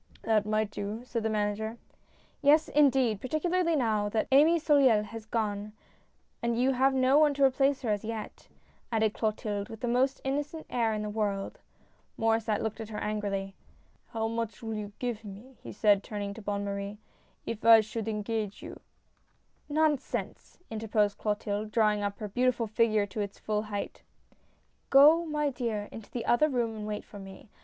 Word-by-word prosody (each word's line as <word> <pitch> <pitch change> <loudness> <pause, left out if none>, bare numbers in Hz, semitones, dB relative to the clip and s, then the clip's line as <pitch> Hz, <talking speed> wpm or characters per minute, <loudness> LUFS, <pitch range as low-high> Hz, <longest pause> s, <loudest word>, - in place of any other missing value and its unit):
" - - -25
That 215 -2 +2
might 215 -1 0
do," 210 +3 -5
said 240 -2 -3
the 220 - -1
manager. 215 +1 -2 0.3
" - - -35 0.3
Yes, 305 +2 +4
indeed, 265 -7 +3
particularly 335 +5 0
now 215 -6 +1
that 220 +1 -1
Amy 305 +5 +6
Soleil 275 -9 +4
has 220 0 -9
gone, 210 -2 -2 0.7
and 235 0 0
you 260 +2 +3
have 265 +1 +2
no 260 +2 +4
one 300 -2 +4
to 280 - +1
replace 270 +1 +3
her 225 - 0
as 205 -1 -1
yet," 220 -1 -6 0.4
added 220 -2 +1
Clotilde, 215 -1 -2
with 225 -1 -9
the 245 - -1
most 260 +3 +1
innocent 290 +4 -3
air 230 -2 +1
in 210 - -3
the 210 - -3
world. 205 -2 -2 0.6
Maurdsset 225 -1 +1
looked 220 0 -3
at 220 - -7
her 210 - -6
angrily. 200 -2 -3 0.3
" - - -37
How 225 -1 -1
much 230 -2 -4
will 225 0 -3
you 210 -1 -5
give 240 -3 -3
me," 215 +6 -11
he - - -8
said, 205 -2 +3
turning 205 -1 -5
to 225 - -10
Bonne 205 0 -3
Marie, 200 +1 -4 0.3
" - - -38
if 225 -2 -5
I 225 -1 +8
should 215 +1 -5
engage 210 -1 -3
you? - - -9 0.3
" - - -41
" - - -40
Nonsense! 300 -4 -1
" - - -40
interposed 215 -2 0
Clotilde, 210 0 -2
drawing 210 -2 +2
up 200 0 -2
her 210 - -5
beautiful 245 +2 +1
figure 215 -1 +2
to 205 +2 -5
its 200 -1 -5
full 210 -1 -1
height. 205 -1 -5 0.5
" - - -40
Go, 310 +5 +7
my 300 -2 0
dear, 225 -5 -3
into 225 - -10
the 240 - -5
other 305 +6 +3
room 235 -4 -1
and 210 -1 -6
wait 210 -1 -4
for 205 - -11
me. 195 +2 -12
220 Hz, 190 wpm, -29 LUFS, 210-255 Hz, 0.7 s, I